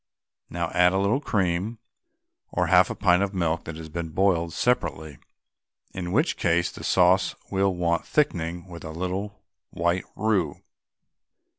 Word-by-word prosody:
Now 85 -1 -3
add 90 +1 +4
a - - +1
little 100 +7 +2
cream, 95 -1 -1 0.7
or 90 - 0
half 90 +2 +5
a - - -4
pint 90 -2 +3
of 100 0 -1
milk 85 -2 -1
that 80 - -6
has 80 0 -8
been 80 +1 -5
boiled 85 -1 +1
separately, 80 - -1 0.7
in 90 -2 -4
which 150 - +1
case 85 0 +1
the - - -10
sauce 95 +1 +3 0.2
will 95 -1 +1
want 85 -1 0
thickening 90 - 0
with 85 -2 -10
a - - -6
little 95 +5 -4 0.3
white 85 +2 -1
roux. 95 -8 0
90 Hz, 150 wpm, -25 LUFS, 85-95 Hz, 0.7 s, half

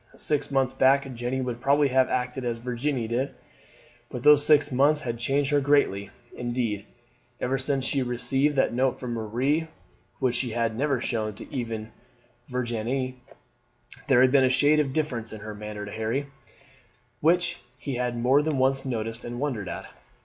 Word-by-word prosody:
Six 145 -1 -1
months 135 -2 +1
back 135 +1 +4
Jeanne 125 +2 -2
would 120 -1 -4
probably 140 +1 +3
have 130 0 +3
acted 125 +1 -2
as 120 -1 -2
Virginie 125 +1 -2
did, 125 +4 -2 0.7
but 125 - -6
those 150 -1 +7
six 145 -1 +4
months 145 +4 +3
had 120 -2 -3
changed 135 +4 0
her 145 -1 +3
greatly; 135 -9 +2 0.3
indeed, 120 -4 -2 0.5
ever 135 +2 -1
since 135 0 0
she 135 0 +1
received 135 +4 +1
that 135 - +2
note 130 +1 +1
from 125 -2 -4
Marie, 125 +8 0 0.5
which 130 -3 +1
she 125 -3 -2
had 115 -1 0
never 140 +1 0
shown 110 -4 -2 0.2
even 115 -5 -3
to 110 - -19 0.6
Virginie, 125 +1 -2 0.9
there 130 -3 +5
had 130 0 +5
been 135 -1 +5
a 130 - +4
shade 145 +4 +4
of 140 -3 +1
difference 130 -7 -2
in 110 - -8
her 110 0 -6
manner 105 0 -7
to 100 - -8
Harry, 110 +6 -2 0.9
which 175 +3 +2 0.2
he 135 +2 -5
had 125 -1 -2
more 130 +5 +4
than 150 -2 -1
once 135 +1 +2
noticed 115 -2 -3
and 120 0 -6
wondered 120 -10 -2
at. - - -6
130 Hz, 170 wpm, -26 LUFS, 120-140 Hz, 0.9 s, those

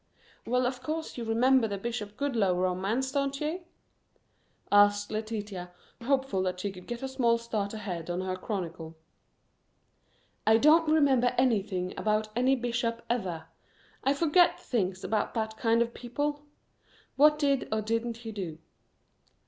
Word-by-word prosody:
"Well, 250 +2 +2
of 250 0 -2
course 315 +4 -4
you 240 - -4
remember 235 +2 +3
the 200 -1 -3
Bishop 210 -1 -5
Goodloe 230 -10 +1
romance, 190 +8 0
don't 275 0 -1
you?" 315 +5 -2 1.1
asked 205 0 +4
Letitia, 210 -4 -4 0.3
hopeful 265 -5 0
that 180 -1 -2
she 200 +2 -2
could 180 -1 -12
get 240 +1 -5
a - - -1
small 245 -3 +2
start 220 -3 -3
ahead 180 -6 -5
on 175 +1 -2
her 185 0 -2
chronicle. 170 -5 -5 1.5
"I 220 +1 +7
don't 310 +5 +5
remember 265 -5 +3
anything 200 -7 +1
about 215 0 0
any 255 +3 +3
bishop, 235 -1 -2
ever. 180 -9 -2 0.6
I 275 +1 +2
forget 335 +4 +4
things 190 -5 -2
about 215 +1 -1
that 220 -1 -2
kind 230 0 +3
of 235 0 -7
people. 290 +4 -3 0.7
What 300 +2 +6
did, 280 -3 +1
or 220 0 +1
didn't 230 +1 -1
he 225 - -4
do?" 180 -7 -5
230 Hz, 145 wpm, -29 LUFS, 200-265 Hz, 1.5 s, I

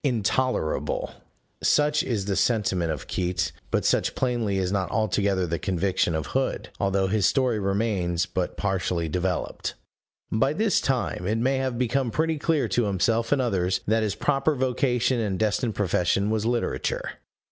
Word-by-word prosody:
Intolerable! 125 - 0 0.5
(Such 150 0 +3
is 105 -6 -2
the 100 -1 -1
sentiment 95 -8 +1
of 75 - -5
Keats; 90 0 -1 0.2
but - - 0
such - - +1
plainly 120 -6 0
is 95 -1 0
not 95 -2 0
altogether 100 -4 +1
the 85 0 -2
conviction 95 -2 0
of 80 - -2
Hood, - - -2
although 95 0 +1
his 100 +1 +2
story 130 -5 +1
remains 95 -4 0
but 90 +1 -3
partially 90 -4 -1
developed.) 90 +2 -2 0.6
By 115 +6 +2
this 215 +3 +2
time 125 -8 -1
it 110 +2 +1
may 130 +4 +1
have 130 -2 -1
become 125 +1 0
pretty 160 +4 0
clear 155 -1 +1
to 120 - +1
himself 110 +4 +1
and 145 - +3
others 95 -6 0
that 110 +2 +2
his 105 -3 -1
proper 145 +1 +1
vocation 125 -1 +1
and 100 -4 -1
destined 110 +2 0
profession 100 +1 +1
was 110 0 0
literature. 120 -1 -2
105 Hz, 160 wpm, -25 LUFS, 95-125 Hz, 0.6 s, Such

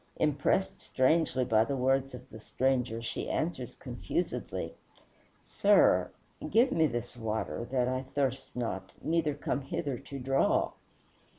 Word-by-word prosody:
Impressed 150 +5 +1
strangely 130 -1 +2
by 110 -2 +4
the 140 +4 -2
words 135 +1 +1
of - - -12
the 110 - -9
stranger, 125 -1 0
she - - -4
answers - - -2
confusedly, - - -3 0.7
"Sir, - - +4 0.4
give 240 +5 +4
me 160 -1 +3
this 120 -2 -4
water, 115 0 -3
that 125 -1 +1
I 130 0 0
thirst 135 -2 -1
not, 95 -6 -4
neither 160 -3 +1
come 145 0 -2
hither 135 -1 -3
to 140 0 -8
draw." 135 +1 +2
130 Hz, 130 wpm, -30 LUFS, 120-140 Hz, 0.7 s, by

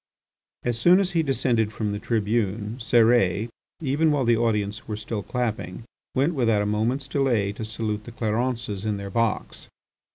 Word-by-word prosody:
As 120 -2 -1
soon 175 +9 +6
as 195 -1 0
he 165 - +2
descended 120 -6 +1
from 105 -2 -2
the 105 - -3
tribune, 110 0 -1
Cérès, 115 -3 +3 0.3
even 150 +3 +2
while 145 -4 +1
the 120 0 +4
audience 110 -2 -1
were 105 - -3
still 105 0 -4
clapping, 115 -5 -3 0.3
went 140 +6 +2
without 115 -7 +2
a - - -2
moment's 115 +6 0
delay 125 -8 +1
to 110 - -6
salute 110 -1 -3
the 120 - -8
Clarences 115 -2 -2
in 105 -2 -1
their 100 0 -6
box. 115 0 -1
115 Hz, 165 wpm, -25 LUFS, 105-125 Hz, 0.3 s, soon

